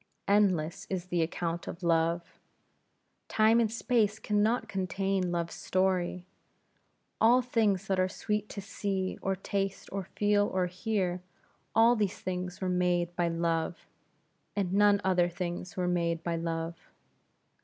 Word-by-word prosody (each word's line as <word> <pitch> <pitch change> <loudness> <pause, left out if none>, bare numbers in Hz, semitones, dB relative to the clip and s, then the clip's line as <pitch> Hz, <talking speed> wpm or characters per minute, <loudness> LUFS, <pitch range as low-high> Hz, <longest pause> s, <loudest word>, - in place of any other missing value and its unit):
Endless 185 -6 +2
is 185 -2 -2
the 175 -1 +1
account 170 +1 -2
of 175 - -7
Love. 170 0 +2 1.0
Time 220 +1 +4
and 225 -2 +2
space 225 -2 +1
can 210 -1 0
not 225 +1 +1
contain 190 -1 -1
Love's 170 -1 -2
story. 185 -1 0 1.0
All 245 +3 +6
things 220 -6 +1
that 190 -1 0
are 185 0 +2
sweet 210 +1 -2
to 200 - -6
see, 190 -1 -3
or 195 0 0
taste, 195 +1 -3
or 195 0 -3
feel, 205 0 +3
or 185 -1 0
hear, 185 -1 -1 0.5
all 230 +2 +6
these 205 -3 -1
things 180 0 -4
were 185 - -1
made 175 -1 +1
by 175 -1 +1
Love; 165 0 -1 0.7
and 190 -3 -1
none 205 0 +5
other 180 -2 +3
things 175 +2 -5
were 180 -1 0
made 170 -2 0
by 170 -1 -1
Love. 165 0 -4
185 Hz, 145 wpm, -30 LUFS, 175-205 Hz, 1.0 s, All